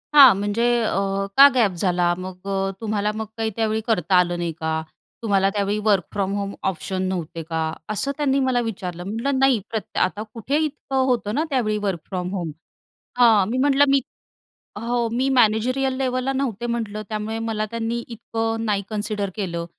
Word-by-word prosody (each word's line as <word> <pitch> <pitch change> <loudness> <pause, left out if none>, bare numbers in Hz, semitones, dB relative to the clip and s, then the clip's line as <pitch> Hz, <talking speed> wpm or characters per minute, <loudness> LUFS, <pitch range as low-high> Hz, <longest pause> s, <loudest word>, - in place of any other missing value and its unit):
हां, 275 -4 +10
म्हणजे, 205 +3 -1 0.2
"अ, 195 -2 0
का 280 +1 +11
गॅप 225 -6 +4
झाला? 175 -1 +2
मग 185 +1 -8 0.3
तुम्हाला 210 -1 0
मग 220 0 -3
काही 225 0 0
त्यावेळी 220 -1 0
करता 185 -5 +2
आलं 175 -1 +3
नाही 170 -1 -2
का 160 0 -1 0.4
तुम्हाला? 195 -2 +3
त्यावेळी 205 0 -1
वर्क 200 -4 +4
फ्रॉम 195 -1 -1
होम 200 0 -3 0.2
ऑप्शन 185 +1 -4
नव्हते 170 -2 -4
का?" 160 0 -1 0.3
असं 240 +7 0
त्यांनी 275 -2 +2
मला 245 -1 +2
विचारलं. 180 -6 -5
म्हटलं, 225 +8 -2
"नाही, 270 -4 +4
प्रत्य 220 -2 -3
आता 205 +3 0
कुठे 250 +5 -1
इतकं 270 -3 -2
होतं 235 -4 0
ना 305 - +2
त्यावेळी 225 -6 0
वर्क 180 -4 -1
फ्रॉम 180 -1 -3
होम," 175 -5 -3 0.7
हां 225 -5 +6
मी 250 - -1
म्हटलं, 280 +1 +4
"मी," 275 0 +4 0.8
हो 235 0 0
"मी 255 +3 +1
मॅनेजेरियल 255 +4 +2
लेव्हल 255 -1 -1
ला 270 - 0
नव्हते," 245 -4 -2
म्हटलं, 220 -3 -3
"त्यामुळे 215 +1 -3
मला 215 -1 -1
त्यांनी 230 +1 -2
इतकं 225 -1 -3
नाही 205 -2 0
कन्सिडर 210 -2 -2
केलं 170 -5 -3
215 Hz, 175 wpm, -23 LUFS, 195-240 Hz, 0.8 s, का